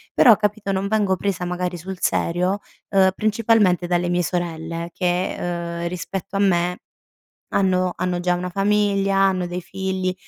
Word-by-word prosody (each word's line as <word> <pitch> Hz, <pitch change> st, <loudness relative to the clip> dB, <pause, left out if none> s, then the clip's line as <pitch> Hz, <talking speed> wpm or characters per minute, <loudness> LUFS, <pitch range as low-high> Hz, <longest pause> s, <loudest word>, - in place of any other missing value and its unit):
però, 235 Hz, -4 st, +7 dB
capito, 210 Hz, -1 st, -1 dB
non 195 Hz, +1 st, -1 dB
vengo 205 Hz, -3 st, +2 dB
presa 185 Hz, -2 st, -2 dB
magari 180 Hz, 0 st, -3 dB
sul 185 Hz, +3 st, -7 dB
serio, 180 Hz, +5 st, 0 dB, 0.3 s
uhm, 190 Hz, -1 st, +4 dB
principalmente 215 Hz, -4 st, +2 dB
dalle 175 Hz, 0 st, +1 dB
mie 175 Hz, 0 st, +1 dB
sorelle 170 Hz, -1 st, -3 dB
che, 180 Hz, 0 st, 0 dB, 0.5 s
uhm, 170 Hz, -, -1 dB
rispetto 180 Hz, +2 st, -5 dB
a -, -, +1 dB
me 180 Hz, -2 st, +2 dB, 0.7 s
hanno 185 Hz, -2 st, +1 dB
hanno 180 Hz, -1 st, -1 dB
già 180 Hz, 0 st, +1 dB
una 180 Hz, +1 st, -3 dB
famiglia, 200 Hz, 0 st, +1 dB
hanno 190 Hz, -2 st, +2 dB
dei 175 Hz, 0 st, -5 dB
figli, 190 Hz, 0 st, -2 dB
185 Hz, 150 wpm, -22 LUFS, 175-195 Hz, 0.7 s, però